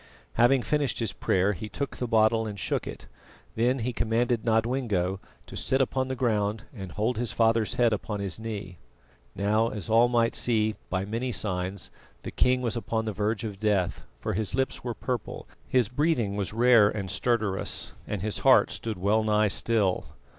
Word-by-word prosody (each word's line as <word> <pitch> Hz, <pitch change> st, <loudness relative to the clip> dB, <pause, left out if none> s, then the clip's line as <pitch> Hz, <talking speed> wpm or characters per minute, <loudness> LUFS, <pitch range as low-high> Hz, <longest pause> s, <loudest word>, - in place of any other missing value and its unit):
Having 120 Hz, +2 st, +4 dB
finished 150 Hz, -3 st, 0 dB
his 115 Hz, -4 st, -2 dB
prayer, 95 Hz, +2 st, +1 dB
he 105 Hz, +4 st, -7 dB
took 140 Hz, +4 st, -4 dB
the 125 Hz, -, -2 dB
bottle 110 Hz, 0 st, +3 dB
and 105 Hz, -1 st, -6 dB
shook -, -, -1 dB
it; -, -, -8 dB, 0.5 s
then 120 Hz, +4 st, +2 dB
he 125 Hz, 0 st, -2 dB
commanded 115 Hz, +1 st, 0 dB
Nodwengo 110 Hz, -5 st, 0 dB, 0.3 s
to -, -, -11 dB
sit 135 Hz, -, +1 dB
upon 130 Hz, 0 st, 0 dB
the 130 Hz, -, -3 dB
ground 110 Hz, -4 st, 0 dB
and 95 Hz, -7 st, -8 dB
hold 110 Hz, +2 st, -1 dB
his 120 Hz, -3 st, -1 dB
father's 115 Hz, -1 st, +2 dB
head 120 Hz, -2 st, +3 dB
upon 105 Hz, 0 st, -3 dB
his 100 Hz, 0 st, -3 dB
knee. 100 Hz, -6 st, -6 dB, 0.6 s
Now, 105 Hz, +4 st, +2 dB
as 105 Hz, 0 st, -5 dB
all 115 Hz, +2 st, +6 dB
might 115 Hz, -1 st, +2 dB
see 110 Hz, -2 st, +2 dB, 0.2 s
by 95 Hz, +1 st, -1 dB
many 115 Hz, +5 st, -2 dB
signs, 95 Hz, -3 st, -2 dB, 0.3 s
the -, -, -5 dB
king 125 Hz, 0 st, +2 dB
was 115 Hz, -2 st, -1 dB
upon 110 Hz, -1 st, -2 dB
the 110 Hz, -, -2 dB
verge 105 Hz, +2 st, -1 dB
of 105 Hz, -3 st, -5 dB
death, 105 Hz, -4 st, 0 dB
for -, -, -3 dB
his 105 Hz, +1 st, -1 dB
lips 130 Hz, +1 st, -1 dB
were 120 Hz, -2 st, -3 dB
purple, 125 Hz, -4 st, -4 dB, 0.2 s
his 125 Hz, -4 st, +2 dB
breathing 125 Hz, -5 st, 0 dB
was 100 Hz, -2 st, -2 dB
rare 115 Hz, -2 st, +5 dB
and 100 Hz, -3 st, -4 dB
stertorous, 105 Hz, -2 st, -1 dB, 0.2 s
and 100 Hz, -3 st, -3 dB
his 110 Hz, -1 st, -2 dB
heart -, -, +5 dB
stood 110 Hz, -3 st, -4 dB
well 105 Hz, +4 st, +2 dB
nigh 105 Hz, 0 st, +2 dB
still. 100 Hz, -3 st, +1 dB
110 Hz, 180 wpm, -27 LUFS, 100-120 Hz, 0.6 s, all